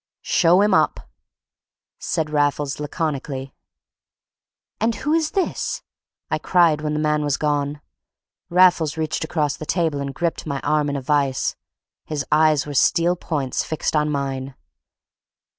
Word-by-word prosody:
"Show 175 +2 +4
him 210 +1 +3
up," - - +1 0.9
said 155 -3 -2
Raffles, 145 -1 0
laconically. 145 -3 -3 1.3
"And 225 +1 +1
who 300 +5 -1
is 320 -1 +2
this?" 380 - -1 0.5
I - - +1
cried 170 -4 +3
when 150 0 -2
the - - 0
man 150 0 +1
was 145 -2 0
gone. 145 -1 -1 0.7
Raffles 170 -3 +4
reached 160 0 -2
across 150 -2 -1
the 155 - -8
table 160 -6 0
and 140 0 -3
gripped 170 -1 -2
my 140 -2 -2
arm 150 0 +1
in 145 - -2
a 140 - -2
vice. 140 -1 +1 0.5
His 150 -2 -3
eyes 155 -2 +4
were 145 - -6
steel 170 +5 +3
points 145 -7 -2
fixed 155 0 -2
on 150 0 +2
mine. 135 -2 -3
150 Hz, 140 wpm, -22 LUFS, 145-165 Hz, 1.3 s, Show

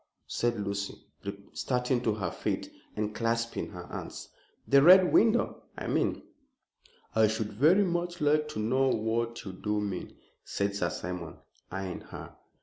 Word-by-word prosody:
said 120 -2 -1
Lucy, 100 0 -2 0.6
starting 125 -1 0
to 110 -3 +1
her 100 -3 -2
feet - - -3 0.2
and 105 0 -2
clasping 115 +1 -1
her 90 -3 -8
hands, - - -7 0.4
"the 140 0 +6
Red 180 +3 +8
Window, 230 +2 +3 0.2
I - - -5
mean." - - 0 0.9
"I 110 -1 +5
should 110 -1 -2
very 160 - +5
much 175 -1 -1
like 150 0 +3
to 150 - -5
know 130 +5 +2
what 115 0 -1
you 95 - -5
do 105 +2 -1
mean," 100 -3 -4 0.3
said 100 0 -1
Sir 90 -4 0
Simon, 90 -3 -5 0.3
eyeing 95 -1 -4
her. - - -10
115 Hz, 145 wpm, -30 LUFS, 100-140 Hz, 0.9 s, Red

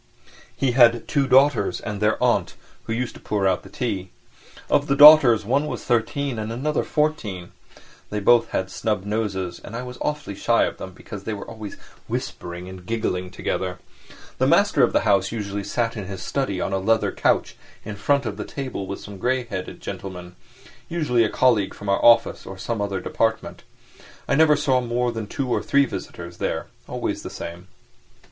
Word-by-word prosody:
He 135 -2 +1
had 120 -2 +4
two 140 -2 +1
daughters 135 -5 +4
and 105 -1 -5
their 105 +1 +2
aunt, - - +1 0.3
who - - -5
used 120 +2 -2
to - - -14
pour 100 -2 0
out 95 -2 +1
the 95 - -14
tea. 100 -4 -3 0.6
Of 145 0 +2
the 140 - +2
daughters 145 -7 +9
one 140 +7 +1
was - - -5
thirteen 120 +2 0
and 110 +1 -4
another 145 +6 -1
fourteen, 110 - -2 0.6
they 105 - -2
both 120 +3 +4
had 95 0 -2
snub 105 -3 -2
noses, 100 -4 -2
and 115 - -8
I 125 - -4
was 125 0 -9
awfully 150 -8 -3
shy 115 +4 +2
of - - -2
them 95 - -8
because 100 +2 -9
they 110 - -3
were 100 - -8
always 110 -2 -8 0.3
whispering 90 +1 -5
and 95 -1 -10
giggling 90 -3 -2
together. 90 0 -3 0.6
The - - +3
master - - +4
of - - +4
the - - +2
house 100 -1 +2
usually 100 -3 -4
sat 115 +2 -1
in 105 -3 -5
his 95 0 -7
study 130 -10 -2
on 95 - -2
a 95 - +1
leather 110 +3 +2
couch - - +1 0.3
in 105 -1 -5
front 140 +7 +1
of 105 -3 -4
the 105 - -4
table 130 -8 -5
with 100 - -5
some 100 -2 -10
grey 130 +4 0
headed 100 -6 -6
gentleman, 90 -2 -7 0.5
usually 150 -9 +1
a 110 - +1
colleague 115 -6 +2
from 100 - -7
our 100 - +1
office 120 0 +4
or 95 - -8
some 110 +2 -3
other 100 -2 -2
department. 110 +4 -1 0.7
I - - +1
never 150 +1 +5
saw 140 -3 +2
more 120 0 -1
than 110 -2 -5
two 135 +5 -3
or 125 - 0
three 140 0 +3
visitors 85 -8 -7
there, - - -2 0.2
always - - -3
the - - -7
same. 85 +2 -8
110 Hz, 190 wpm, -23 LUFS, 95-125 Hz, 0.7 s, daughters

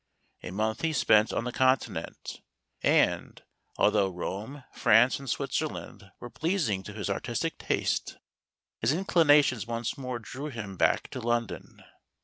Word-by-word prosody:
A - - -7
month 110 +4 -2
he 165 -1 0
spent 110 -6 +4
on - - -1
the 125 - -3
Continent; 130 +1 -1 0.4
and, - - +1 0.3
although 105 -2 +3
Rome, 105 +9 -6
France, 120 +4 +4
and 135 -2 -8
Switzerland 100 - -3
were 120 - -9
pleasing 160 - 0
to 105 - -9
his 105 -3 -4
artistic - - -2
taste, - - -1 0.6
his 110 - +2
inclinations 150 - +3
once 115 +2 -3
more 130 -2 -3
drew 130 +6 -7
him 105 -8 -6
back - - +2
to - - -6
London. 120 0 -3
120 Hz, 135 wpm, -28 LUFS, 105-135 Hz, 0.6 s, spent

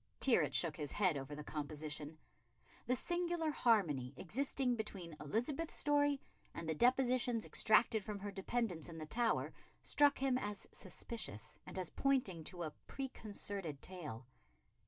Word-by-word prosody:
Tyrwhitt 260 -4 +5
shook 160 -3 +1
his 150 -3 -3
head 185 -6 +3
over 140 +1 -4
the 150 - -6
composition. 150 0 -4 0.7
The 250 - +3
singular 345 +1 0
harmony 155 - +2
existing 255 +4 0
between 195 -7 -5
Elizabeth's 245 - -1
story 290 -1 +3 0.4
and 165 - -4
the 160 - +1
depositions 245 - +3
extracted 220 0 +4
from 210 0 -4
her 200 +1 -5
dependants 195 -3 -1
in 165 - -8
the 155 - -5
Tower 230 +8 +1 0.3
struck 290 -1 +5
him 260 -1 +2
as 205 -3 -4
suspicious, 165 - -5
and - - -7
as 185 -3 -3
pointing 250 -12 +1
to 175 0 -3
a 155 - -3 0.2
preconcerted 200 - -4
tale. 150 -9 -5
205 Hz, 140 wpm, -38 LUFS, 155-255 Hz, 0.7 s, Tyrwhitt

